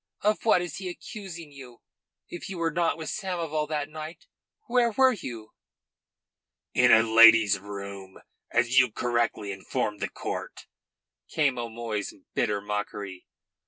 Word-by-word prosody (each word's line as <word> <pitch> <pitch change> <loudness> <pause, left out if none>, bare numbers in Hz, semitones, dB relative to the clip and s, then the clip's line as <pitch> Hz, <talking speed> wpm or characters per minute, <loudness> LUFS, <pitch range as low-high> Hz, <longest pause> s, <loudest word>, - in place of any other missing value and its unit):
Of 210 +2 +1
what 185 -5 +4
is 175 -4 -6
he 190 -1 -5
accusing 175 -4 -8
you? 130 -4 -13 0.4
If 175 - -8
you 190 - -5
were 165 -1 0
not 170 +1 +1
with 160 -1 -5
Samoval 165 -6 -2
that 150 -2 -1
night, 155 +2 -9 0.4
where 240 -1 +3
were 260 +3 +4
you?" 120 - -8 1.2
"In 125 0 +5
a 110 - +7
lady's 115 -2 +7
room, 100 -1 -8 0.3
as 125 +2 +3
you 130 -3 +4
correctly 120 -3 -1
informed 100 +2 -3
the - - -2
court," - - -6 0.6
came 140 -5 +1
O'Moy's 115 -3 -4 0.2
bitter 105 -1 0
mockery. 105 -2 -5
125 Hz, 135 wpm, -27 LUFS, 105-170 Hz, 1.2 s, a